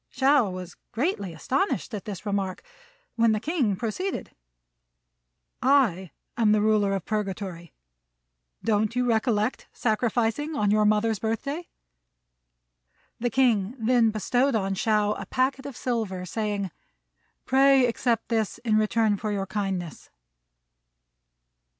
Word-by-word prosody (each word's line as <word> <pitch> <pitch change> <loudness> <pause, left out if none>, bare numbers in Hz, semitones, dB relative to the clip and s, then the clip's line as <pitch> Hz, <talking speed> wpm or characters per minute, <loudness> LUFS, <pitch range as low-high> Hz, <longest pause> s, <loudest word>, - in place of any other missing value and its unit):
Shao 265 -4 +3
was 185 -1 -7
greatly 230 - -1
astonished 255 - -1
at 210 0 -5
this 205 -2 -7
remark, 200 - -2 0.5
when 230 -1 +4
the 215 - 0
King 265 - 0
proceeded, 235 - -3 1.3
"I 250 -10 +3 0.3
am 220 -3 +3
the 210 - +3
Ruler 210 -2 +2
of 190 -3 -4
Purgatory. 195 -5 -4 0.9
Don't 220 0 +1
you 250 0 +1
recollect 225 -1 0
sacrificing 240 +6 0
on 205 -5 +1
your 210 0 +3
mother's 215 0 +2
birthday?" 275 +9 -3 1.5
The 245 +1 0
King 230 -3 +2
then 235 0 +3
bestowed 245 +5 +1
on 195 -2 0
Shao 210 +1 +1
a 195 - -7
packet 265 +1 0
of 275 - -8
silver, 215 -7 -2
saying, 205 -1 -2 0.7
"Pray 270 0 +5
accept 235 -1 0
this 220 -3 0
in 215 -2 +3
return 215 -1 +2
for 215 +1 -3
your 195 -1 -1
kindness." 190 -5 -4
220 Hz, 120 wpm, -26 LUFS, 200-250 Hz, 1.5 s, Pray